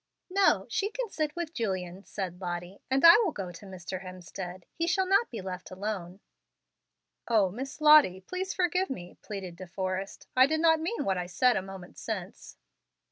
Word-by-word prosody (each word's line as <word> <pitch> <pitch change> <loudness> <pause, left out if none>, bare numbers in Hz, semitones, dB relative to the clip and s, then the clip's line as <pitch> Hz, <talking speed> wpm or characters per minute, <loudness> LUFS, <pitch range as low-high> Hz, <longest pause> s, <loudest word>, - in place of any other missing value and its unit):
"No, 390 0 +4
she 405 - -1
can - - -4
sit 305 -1 -2
with 340 -2 -4
Julian," 190 - -3
said 185 -2 -5
Lottie, 175 +1 -5
"and 265 +4 +3
I 335 +3 +11
will 430 -7 +2
go 190 -9 -5
to 175 +4 -12
Mr. 185 0 -6
Hemstead. 185 0 -8
He 335 0 -1
shall 380 +2 +2
not 395 +5 +3
be 225 -4 -6
left 185 -1 -6
alone." 190 -1 -5 1.1
"O 210 -6 +3
Miss 270 - -6
Lottie! 300 -12 +7
please 370 - -4
forgive 365 +1 +1
me," 180 -9 -7
pleaded 190 -4 -6
De 185 +1 -9
Forrest; 190 +1 -4
"I 255 +1 +7
did 315 +2 0
not 320 -1 +5
mean 350 +9 -2
what 190 -2 +1
I 175 - -3
said 245 +8 +3
a - - +1
moment 190 -1 -10
since." 205 -3 -6
200 Hz, 185 wpm, -29 LUFS, -, 1.1 s, I